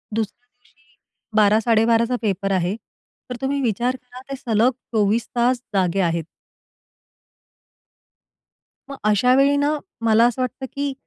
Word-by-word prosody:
दुसऱ्या 225 +2 -4
दिवशी 245 0 -33 0.4
12-12.30चा 225 +3 +3
पेपर 195 -2 -1
आहे. 185 +1 0 0.5
तर 250 - -4
तुम्ही 275 +1 -1
विचार 240 +1 0
करा, 250 0 -13
ते - - -2
सलग 235 0 +2 0.2
24 215 +1 +1
तास 245 +1 +2
जागे 190 -1 +1
आहेत. 170 -2 0 2.7
मग 275 - -7
अशा 215 +4 +4
वेळी 275 +1 +4
ना, 290 +2 +1 0.3
मला 225 +1 +5
असं 245 +2 -2
वाटतं, 255 +1 -3
की 280 0 -2
235 Hz, 125 wpm, -21 LUFS, 210-255 Hz, 2.7 s, मला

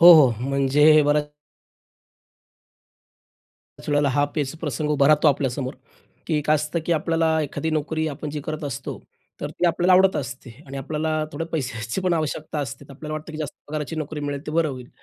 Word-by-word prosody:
हो, 175 +1 +11
हो. 150 -6 +8 0.2
म्हणजे 145 +3 +5
बऱ्याच 150 0 +2 2.5
त्याच - - -11
वेळेला 145 -1 +3
हा 145 +2 +2
पेचप्रसंग 150 -1 -2
उभा 140 -2 +4
राहतो 155 0 +5
आपल्यासमोर 135 -1 -1 0.5
की 155 -3 +1
काय 155 - +5
असतं, 155 +3 -2
की 175 - +2
आपल्याला 160 0 +1
एखादी 160 +2 -3
नोकरी 155 +1 -1
आपण 150 +1 -5
जी 150 0 -4
करत 155 0 -4
असतो. 135 -2 -5 0.4
तर - - -3
ती 180 - 0
आपल्याला 175 +2 +3
आवडत 190 +1 +5
असते 130 -2 -5 0.2
आणि 135 0 -7
आपल्याला 155 +3 -1
थोडे 165 - -3
पैशाची 125 -1 -2
पण 185 -1 +1
आवश्यकता 155 -1 -2
असते 140 0 -5
तर - - -14
आपल्याला 155 +2 -7
वाटतं, 155 +1 -7
की 155 - -7
जास्त 155 -3 -4
पगाराची 155 +1 -4
नोकरी 155 -1 -4
मिळेल 145 -1 -3
तर 150 - -4
बरं 165 -1 +2
होईल. 130 -3 -7
150 Hz, 180 wpm, -23 LUFS, 140-160 Hz, 2.5 s, हो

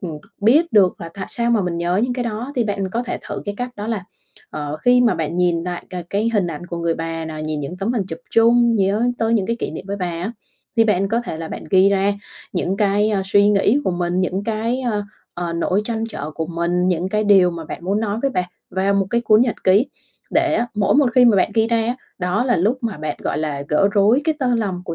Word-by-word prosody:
ừm, 165 -5 -5 0.2
biết 270 +8 +4
được 195 -4 +4
là 170 - -6
tại 190 -1 -5
sao 235 -1 0
mà 230 -3 +3
mình 175 -2 -2
nhớ 175 +1 0
những 245 +1 0
cái 245 -1 -3
đó 235 +4 -4
thì 240 - +2
bạn 200 -2 -2
có 235 +5 -1
thể 245 - -4
thử - - -4
cái 205 -1 -4
cách 245 0 -3
đó 210 +1 -5
là, 215 -5 -3 0.5
ờ, 150 0 -4
khi 245 0 +5
mà 240 -2 +3
bạn 165 +2 -3
nhìn 175 -2 +1
lại 180 -1 -4
c 175 -2 -7
cái 210 +3 +1
hình 200 -4 +2
ảnh 170 +1 -6
của 170 - -5
người 170 -1 0
bà 165 0 -4
nè, 160 - -6
nhìn 155 -1 -3
những 140 +6 -5
tấm 220 +5 0
hình 225 - 0
chụp 165 -1 -6
chung, 235 +1 +4
nhớ 200 +2 +1 0.2
tới 225 0 +1
những 200 -4 +1
cái 230 0 -1
kỷ - - -3
niệm 155 - -7
với 200 - -3
bà 185 -3 -2
á 175 +5 -4 0.4
thì 225 - +5
bạn 195 -3 +1
có 230 +3 +1
thể 160 - -5
là 165 -1 -5
bạn - - -7
ghi 190 0 +5
ra 200 0 +2 0.4
những 185 +1 -1
cái, 205 +1 +2
a, 195 -2 0
suy 205 +1 +4
nghĩ 210 +5 +3
của - - +1
mình, 175 0 -1
những 190 +2 -1
cái, 230 +4 -1 0.5
ờ, 175 -1 -3
nỗi 180 +4 0
trăn 225 0 -2
trở 155 -8 -5
của 160 +1 -4
mình, 175 +2 0
những 180 0 0
cái 210 +2 0
điều 195 -3 +5
mà 170 -1 -7
bạn 170 - -8
muốn 200 +3 0
nói 215 0 -1
với 275 - +1
bà 180 -6 -2 0.2
vào 195 +2 +1
một 195 -1 +1
cái 235 - +2
cuốn 215 -2 +4
nhật 240 -2 +2
ký, 200 +8 +4 0.4
để 325 -1 +2
á, 240 - 0
mỗi 205 -1 +2
một 285 -2 +5
khi 250 -1 +6
mà 225 -4 +5
bạn 185 - +2
ghi 225 0 +3
ra 235 - +2
á, 240 +2 -1 0.2
đó 180 +6 0
là 245 -2 +2
lúc 215 +10 +1
mà 225 -4 -2
bạn, 155 -1 -3
gọi - - -1
là, 150 -3 -2
gỡ 175 +6 +3
rối 215 +6 +4
cái 315 - +1
tơ 250 -4 +1
lòng 195 -6 -2
của 170 - -4
200 Hz, 265 wpm, -20 LUFS, 175-230 Hz, 0.5 s, khi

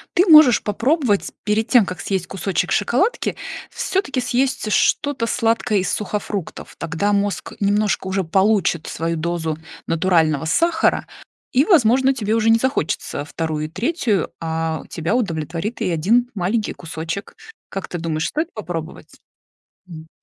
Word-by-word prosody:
Ты 365 +2 +4
можешь 305 -7 +8
попробовать, 230 - 0
перед 215 +1 0
тем, 240 -6 +6
как 180 -2 -6
съесть 190 -3 -2
кусочек 190 0 -2
шоколадки, 285 - +1 0.3
всё-таки 370 -9 -1
съесть 250 -3 0
что-то 280 +2 +2
сладкое 225 -2 +1
из 185 - -1
сухофруктов. 205 -3 -4
Тогда 170 +5 -1
мозг 200 0 -1
немножко 205 -1 +1
уже 190 0 0
получит 190 -1 +2
свою 165 +1 -2
дозу 165 -1 -2 0.3
натурального 165 -4 +2
сахара 325 - +2 0.5
и, 260 - +5
возможно, 265 - +4
тебе 215 -5 -2
уже 225 0 +2
не 225 0 +5
захочется 255 - -1
2 155 0 -3
и - - -7
3, 225 - -1
а 160 -1 -2
тебя 170 +6 -1
удовлетворит 170 - -2
и 200 - 0
1 210 +10 +2
маленький 205 +4 -1
кусочек. 165 +3 -6 0.3
Как 195 - -5
ты 175 - -5
думаешь, 160 -1 -2
стоит 315 +3 -3
попробовать? 175 -6 -7 0.7
М. 160 -2 -10
200 Hz, 135 wpm, -20 LUFS, 165-240 Hz, 0.7 s, можешь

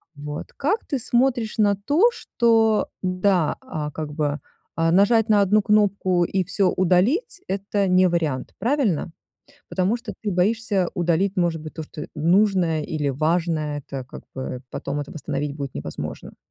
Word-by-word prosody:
Вот. 145 0 -6
Как 345 +11 0
ты 275 - -2
смотришь 240 -2 +1
на 205 -2 +4
то, 290 - +3
что 225 - +2
да, 185 -3 +1
а 150 -1 -5
как 150 0 -5
бы, 150 -1 -1 0.4
а, 165 0 +2
нажать 215 +5 +4
на 210 -1 +5
одну 205 +2 +4
кнопку 200 -4 +2
и 190 +1 0
всё 190 +1 +1
удалить- 230 - +1
это 200 0 -1
не 185 0 +5
вариант, 160 -7 -1
правильно? 230 - 0 0.6
Потому 190 +4 +1
что 235 -3 -7
ты 205 - -1
боишься 195 0 +1
удалить, 175 +3 +1
может 170 -3 +1
быть, 155 - -9
то, 160 - -5
что 155 0 -8
нужное 175 0 +2
или 150 -2 -2
важное. 155 +1 0
Это 135 -1 -7
как - - -11
бы 130 -1 -5
потом 145 - -4
это 145 - -6
восстановить 145 -1 -4
будет 140 -3 -6
невозможно. 75 0 -6
185 Hz, 155 wpm, -23 LUFS, 155-210 Hz, 0.6 s, на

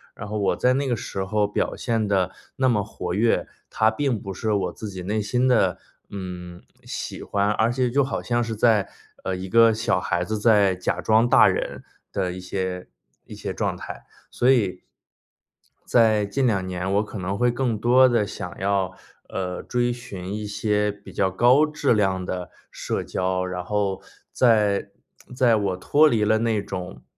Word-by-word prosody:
然 105 - -7
后 105 +1 -4
我 100 - +1
在 125 0 +2
那 135 +1 0
个 120 - +1
时 95 -2 -4
候 105 +1 0
表 105 - -2
现 115 -4 -1
得 95 -2 +1 0.3
那 130 -1 +3
么 105 -4 +1
活 90 -4 -5
跃， 115 +4 +1 0.2
它 110 0 +3
并 120 -1 -1
不 95 -1 -6
是 110 +3 -2
我 95 -3 -1
自 110 - -7
己 95 -2 -7
内 105 +3 -1
心 125 +5 +1
的， 95 -8 +2 0.3
嗯， 90 -2 -7 0.2
喜 - - -6
欢， 100 0 0
而 110 +2 +2
且 125 0 0
就 140 +3 +2
好 135 - -3
像 120 -1 0
是 115 -1 -4
在， 110 -3 +3 0.4
呃， 95 - -2
一 95 0 -6
个 115 0 +6
小 110 -4 0
孩 85 -1 -1
子 110 +2 -3
在 105 -4 +4
假 90 - -2
装 110 +2 +3
大 - - +6
人 - - -2 0.3
的 90 -1 -1
一 90 - -7
些 90 0 -4 0.4
一 - - -11
些 - - -5
状 - - -1
态， - - -9 0.2
所 125 +2 +3
以 100 -8 +1 1.1
在 110 -3 +4
近 130 +5 0
两 95 -4 0
年 90 +1 -3
我 105 +2 +3
可 105 - -8
能 95 +2 -3
会 125 0 +2
更 120 -3 -1
多 125 +4 +5
地 115 -4 +2
想 95 -2 -7
要， 95 -1 0 0.4
呃， 90 -1 -4
追 120 0 0
寻 100 -6 -7
一 105 0 -4
些 105 0 0
比 100 0 -14
较 95 -1 +1
高 125 +10 +4
质 150 -4 +1
量 95 -3 +1
的 90 -1 -4 0.2
社 - - -3
交， 90 0 -1
然 90 -1 -4
后 100 -1 -1 0.3
在 105 -5 +2 0.5
在 120 -3 +4
我 95 -3 -1
脱 150 +11 +4
离 115 -6 +2
了 110 +1 +3
那 115 -3 0
种 90 -2 -7
105 Hz, 200 characters per minute, -24 LUFS, 95-120 Hz, 1.1 s, 个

